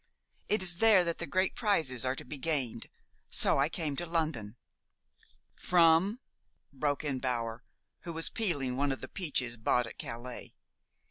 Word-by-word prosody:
It 210 -2 +2
is 175 -2 +5
there 210 -3 +6
that 170 -1 -2
the 170 - -4
great 185 +5 0
prizes 160 - +1
are 130 +1 0
to - - -8
be 145 +2 -7
gained; 130 -7 -1 0.4
so - - +4
I 140 +3 +2
came 155 -4 -3
to 175 - -2
London." 155 -11 -2 1.0
"From 180 +6 +3 0.3
" - - -44
broke 145 +2 -1
in 140 -3 -2
Bower, 120 -2 -3 0.4
who 170 - -7
was 165 0 -1
peeling 145 - -1
one 140 +1 0
of 135 - -4
the - - -6
peaches 130 -9 -2
bought 120 +2 +1
at - - -11
Calais. 120 +1 -7
150 Hz, 170 wpm, -31 LUFS, 125-175 Hz, 1.0 s, there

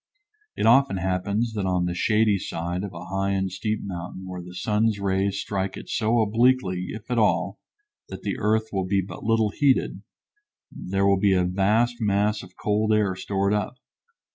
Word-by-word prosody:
It - - 0
often 135 -1 +5
happens 100 +5 -1
that 100 -3 -2
on 90 -1 +1
the 90 - -1
shady 105 +2 +2
side 85 +2 -4
of 100 - -5
a 85 0 -9
high 95 +1 -1
and 95 -1 -1
steep 105 +3 -2
mountain 95 0 -6
where 90 -1 -6
the 90 +1 -11
sun's 105 +2 +1
rays 100 0 0
strike 95 -1 -3
it - - -10
so 115 +1 +2
obliquely, 110 -5 +2
if 110 +2 -8
at 120 - +2
all, 110 - +1 0.5
that - - -8
the - - -3
earth 110 +1 +1
will 95 -2 -1
be 100 0 +2
but 90 -2 -9
little 110 -1 +2
heated, 140 +1 +1 0.7
there 95 +1 -2
will 100 -1 +4
be 100 -1 +3
a 90 -1 +3
vast 105 +6 +1
mass 105 0 +1
of 90 0 -15
cold 105 +1 0
air 105 -3 +2
stored 100 +1 -1
up. 105 +4 -1
100 Hz, 185 wpm, -25 LUFS, 95-110 Hz, 0.7 s, often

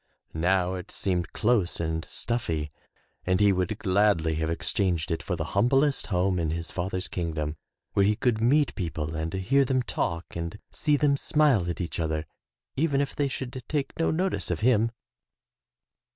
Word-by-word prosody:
Now 90 +2 +2
it 95 +1 -6
seemed 90 -3 -2
close 105 -6 +1
and 80 -1 -2
stuffy 85 -11 -2 0.5
and 90 0 +1
he 100 -1 +5
would 95 +3 -1
gladly 95 -5 +2
have 80 0 -1
exchanged 85 0 0
it 80 - -1
for - - -2
the - - -2
humb 100 +4 +4
lest 135 +1 +2
home 90 -2 +1
in 80 -2 0
his 85 +1 -3
father's 95 +1 -2
kingdom 80 -3 -3 0.4
where 100 - +4
he 105 +2 +3
could 115 -1 +1
meet 140 +5 +3
people 80 -3 -3
and 80 +1 -2
hear 110 +9 +2
them 130 -1 +1
talk 85 -6 -3
and 85 +3 -4
see 150 -2 +1
them 145 -1 +3
smile 140 - +2
at 85 - -3
each 85 -1 -4
other, 80 -1 -1 0.5
even 145 -1 +2
if 140 -1 -1
they 145 - +1
should 130 -1 -5
take 145 -3 -1
no 165 - +2
notice 185 +4 0
of - - -2
him. 115 -1 +4
95 Hz, 175 wpm, -27 LUFS, 85-125 Hz, 0.5 s, he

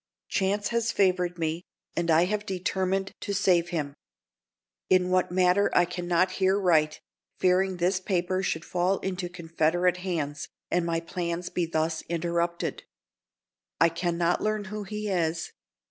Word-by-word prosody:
Chance 200 +1 0
has 235 -1 0
favored 180 -3 +1
me, 165 0 -1 0.3
and 170 0 -1
I 165 +2 +5
have 210 +2 -1
determined 190 0 -1
to 200 - -3
save 180 -3 +3
him. 150 -5 -2 1.0
In 185 -1 +3
what 185 -1 +2
manner 180 +2 +3
I 175 - +6
can 175 0 -5
not 180 +2 +3
here 190 +1 +4
write, 155 -5 +2 0.4
fearing 185 0 +2
this 180 +2 +1
paper 185 0 0
should 165 -3 -2
fall 180 +2 +1
into 185 -2 -3
Confederate 175 +1 +1
hands, 160 -6 -3 0.2
and 175 -1 +1
my 165 0 0
plans 170 0 -4
be 175 -2 -1
thus 160 0 -1
interrupted. 170 0 -1 1.0
I 165 - +6
can 170 +1 -2
not 175 0 +1
learn 215 -1 0
who 210 -1 -4
he 210 +1 -4
is. 165 -4 -1
180 Hz, 150 wpm, -27 LUFS, 170-190 Hz, 1.0 s, I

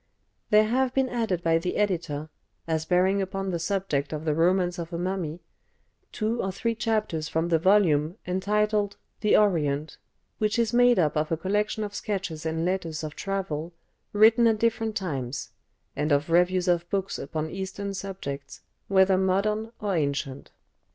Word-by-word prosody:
There 215 -1 +6
have 255 +3 0
been 265 -1 +2
added 220 -8 -1
by 165 0 +3
the 180 +2 -3
editor, 165 -7 -1 0.4
as 160 -1 -1
bearing 190 +2 +3
upon 195 0 -3
the 170 - -2
subject 165 -6 -1
of 155 0 -4
the 155 - +2
"Romance 175 +2 +2
of 170 0 -5
a 170 - -3
Mummy," 175 -2 -3 0.7
two 225 +2 -1
or 190 - -2
three 230 +5 -1
chapters 215 -8 -1
from 165 +1 0
the 165 -2 +3
volume 170 -3 +3
entitled 205 +2 0 0.2
"The 210 - +4
Orient," 155 -7 +1 0.4
which 215 0 +1
is 230 -1 +1
made 245 -1 +5
up 155 -5 +2
of 155 +1 0
a 165 - +1
collection 210 +5 -1
of 205 -1 -5
sketches 190 -7 -3
and 160 +1 -1
letters 175 -4 -2
of 150 -1 -5
travel 180 -5 -3 0.4
written 225 +3 +6
at 225 -1 +3
different 225 -1 0
times, 135 - -4 0.4
and 150 +1 -1
of 145 +3 +1
reviews 180 +2 +3
of 175 -1 +1
books 195 0 -2
upon 155 +2 -4
Eastern 195 +1 -4
subjects, 185 -8 -6 0.3
whether 190 -1 +4
modern 210 +4 0
or 205 -3 -1
ancient. 140 -3 -2
185 Hz, 165 wpm, -26 LUFS, 160-210 Hz, 0.7 s, There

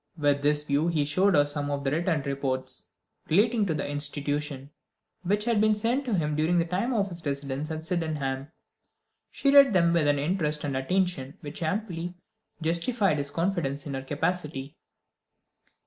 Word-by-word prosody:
With 145 -2 +2
this 150 +1 +3
view 150 +2 +1
he 155 -4 +1
showed 185 +6 +2
her 145 -1 +5
some 145 0 -3
written 155 +2 0
reports, 135 -2 -3 0.4
relating 215 +4 +3
to 160 - 0
the - - -2
institution, 145 -1 -2 0.5
which 205 +4 0
had 230 -3 +2
been 215 0 +4
sent 235 +6 0
to 235 -5 0
him 150 -4 0
during 160 +4 +2
the 170 - +2
time 185 +9 -1
of 205 -5 +1
his 170 -2 -8
residence 140 +1 -3
at 160 0 -5
Sydenham. 150 -6 -2 0.8
She 275 - +1
read 280 -4 +7
them 170 -2 +4
with 165 -3 +3
an 145 0 +3
interest 150 0 0
and 140 -2 -2
attention 160 0 -1
which 150 0 -8
amply 175 0 -3 0.5
justified 170 - +1
his 140 0 -2
confidence 160 -4 -1
in 145 - -5
her 135 - -3
capacity. 145 -1 -3
155 Hz, 165 wpm, -27 LUFS, 145-185 Hz, 0.8 s, read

